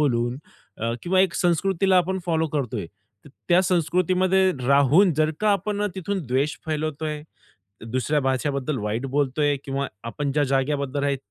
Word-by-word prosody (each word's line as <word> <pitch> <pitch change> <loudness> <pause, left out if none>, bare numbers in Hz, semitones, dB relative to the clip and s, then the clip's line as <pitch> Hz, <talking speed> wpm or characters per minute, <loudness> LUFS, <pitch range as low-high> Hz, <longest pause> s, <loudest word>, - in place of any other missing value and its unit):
बोलून 120 -4 +1 0.4
अ, 115 +1 -1
किंवा 185 +1 +2
एक 185 -2 +2
संस्कृतीला 185 +2 +2
आपण 185 +1 +1
फॉलो 160 -1 +1
करतोय. 125 -10 -3 0.4
तर - - -13 0.2
त्या 175 +1 +5
संस्कृतीमध्ये 185 +2 +2 0.2
राहून 140 +7 +5
जर 155 +1 +2
का 215 0 +3
आपण 205 +1 -1
तिथून 190 -3 -3
द्वेष 135 +5 0
फैलवतोय, 155 -1 -3 0.6
दुसऱ्या 130 +5 0
भाषेबद्दल 135 +1 -1
वाईट 110 +5 -2
बोलतोय 145 +1 +1
किंवा 140 0 -2 0.2
आपण 140 +4 -3
ज्या 150 +1 +2
जागेबद्दल 140 +1 -1
आहे 140 -1 +1
150 Hz, 145 wpm, -24 LUFS, 135-180 Hz, 0.6 s, त्या